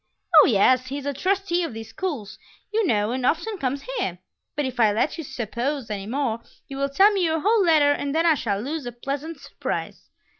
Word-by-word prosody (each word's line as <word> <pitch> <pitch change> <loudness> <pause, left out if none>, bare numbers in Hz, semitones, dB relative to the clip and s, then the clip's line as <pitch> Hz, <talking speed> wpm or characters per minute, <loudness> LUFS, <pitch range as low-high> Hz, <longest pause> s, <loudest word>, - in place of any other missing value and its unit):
"Oh, - - +5
yes; 255 +3 +3
he 275 +2 -4
is 285 - -7
a 285 - -1
trustee 370 +3 0
of 290 -9 -4
these 225 0 -7
schools, 255 - -5 0.3
you 440 -3 +2
know, 210 -3 +1
and 255 +1 -2
often 350 - 0
comes 275 -1 -2
here. 450 - -3 0.4
But 295 - -1
if 255 -1 -5
I 220 -3 +5
let 220 +8 0
you - - -3
'suppose' 245 +1 -3
any 200 -1 -4
more, 240 -2 -1 0.3
you 275 - -7
will 275 0 0
tell 390 +9 +5
me 390 -3 0
your 320 -1 +1
whole 430 +2 +3
letter 310 -4 +5
and 285 0 -2
then 325 +1 +2
I 330 - +6
shall 205 -9 -1
lose 280 +3 -4
a - - -4
pleasant 280 +6 -5
surprise." - - -5
280 Hz, 220 wpm, -24 LUFS, 240-330 Hz, 0.4 s, I